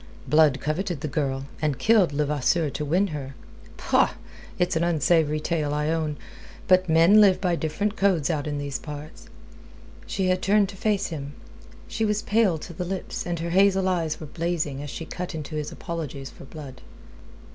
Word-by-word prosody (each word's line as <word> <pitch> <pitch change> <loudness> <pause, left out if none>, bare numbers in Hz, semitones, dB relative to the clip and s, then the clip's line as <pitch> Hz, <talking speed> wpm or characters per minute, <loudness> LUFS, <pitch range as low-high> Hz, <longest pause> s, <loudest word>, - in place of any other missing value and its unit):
Blood 150 -3 +4
coveted 165 +1 -2
the 155 - -2
girl, 135 -2 -2 0.2
and 150 -4 0
killed 215 -7 +4
Levasseur 145 +1 +1
to 150 - -4
win 175 +7 +2
her. 140 -3 -6 0.4
Pah! - - +2 0.4
It's 180 0 +1
an 165 - +1
unsavoury 160 -2 +2
tale, 150 -2 -1
I 150 +1 0
own. 155 -2 -1 0.5
But 185 -1 +4
men 165 +7 +6
live 195 -3 +5
by 180 -3 +1
different 200 +7 -2
codes 190 -8 +2
out 150 -2 -2
in 145 -1 -2
these 140 -1 -3
parts...." 150 +1 -9 0.8
She 190 - -1
had 185 0 +1
turned 200 0 +3
to 200 - -9
face 205 0 0
him. 145 -3 -6 0.5
She 225 - -2
was 210 -1 0
pale 210 -6 +2
to 170 - -9
the 180 - -4
lips, 185 0 -4
and 175 -1 -1
her 170 0 -3
hazel 190 +1 +4
eyes 165 -4 -1
were 155 - -7
blazing, 155 -3 -2
as 145 - -6
she 165 - -6
cut 180 0 -5
into 155 0 -6
his 150 -1 -3
apologies 145 -5 -6
for - - -13
Blood. 135 -3 -10
160 Hz, 180 wpm, -25 LUFS, 150-185 Hz, 0.8 s, men